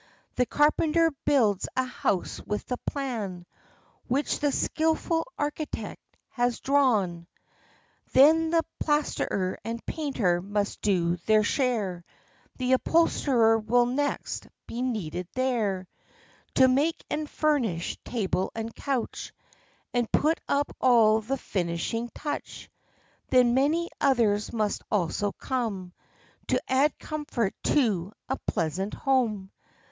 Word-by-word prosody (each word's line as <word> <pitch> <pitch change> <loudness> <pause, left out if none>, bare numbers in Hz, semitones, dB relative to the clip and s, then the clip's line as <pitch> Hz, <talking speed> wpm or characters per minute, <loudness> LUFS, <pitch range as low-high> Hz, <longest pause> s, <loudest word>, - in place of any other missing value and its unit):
The 250 - +1
carpenter 315 +2 +3
builds 220 -9 +3
a 260 - +2
house 205 -7 -2
with 210 0 -2
the 250 - -3
plan 220 -11 -3 0.6
Which 275 +4 0
the 290 -1 +1
skilful 325 - 0
architect 295 +1 -4 0.3
has 245 -1 0
drawn; 215 -12 +2 0.8
Then 320 +4 +6
the 330 0 +3 0.2
plasterer 290 -10 0
and 230 +2 -5
painter 230 - 0
must 205 +2 -2
do 175 -4 +1
their 215 -1 +5
share 210 -8 0 0.5
The 255 0 +1
upholsterer 255 -6 +3
will 240 +3 +3
next 285 +4 -2 0.2
be 240 - -5
needed 180 -9 -3
there, 220 -8 0 0.7
To 260 - +7
make 285 +6 +1
and 300 -1 -2
furnish 240 - 0
table 190 -5 -1
and 225 0 -4
couch, 270 -4 -3 0.6
And 240 -2 0
put 315 +3 +2
upon 285 +1 0
all 225 -3 +5
the 265 +6 -2
finishing 190 +4 -2
touch; 295 -1 -5 0.6
Then 250 -2 +5
many 305 +6 +1
others 225 -7 +2
must 215 -3 -1
also 200 +1 0
come, 210 -9 -3 0.5
To - - +2
add 270 +3 +2
comfort 290 -9 -2
to 210 - +1
a 265 - -2
pleasant 185 +6 -1
home. 225 -8 0
245 Hz, 115 wpm, -27 LUFS, 205-280 Hz, 0.8 s, To